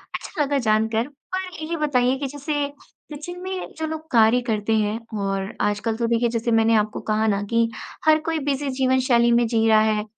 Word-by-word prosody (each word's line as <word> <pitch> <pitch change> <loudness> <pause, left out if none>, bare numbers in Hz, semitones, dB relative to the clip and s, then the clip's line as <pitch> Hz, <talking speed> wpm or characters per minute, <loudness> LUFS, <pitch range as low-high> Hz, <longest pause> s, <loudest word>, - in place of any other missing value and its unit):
अच्छा 335 - -4
लगा 285 0 +1
जानकर। 220 0 +1 0.3
पर 375 0 -3 0.2
ये 335 +2 -3
बताइए 265 -4 +1
कि 280 - -2
जैसे 290 +1 -2 0.5
किचन 350 +5 -7
में 375 0 -5
जो 320 - -2
लोग 315 0 -6
कार्य 230 +1 +5
करते 215 -1 0
हैं 215 +1 0 0.2
और 195 0 -2
आजकल 210 +2 0
तो 235 0 0
देखिए, 235 0 +2
जैसे 230 0 -1
मैंने 225 0 +4
आपको 215 0 0
कहा 215 +1 +2
ना 200 -1 +1
कि 230 0 +2 0.4
हर 310 0 +5
कोई 325 -1 0
बिज़ी 280 0 -1
जीवन 260 0 +2
शैली 235 -1 +4
में 235 0 +4
जी 225 -1 +1
रहा 215 -1 +6
है, 215 -1 +1
235 Hz, 200 wpm, -23 LUFS, 220-290 Hz, 0.5 s, रहा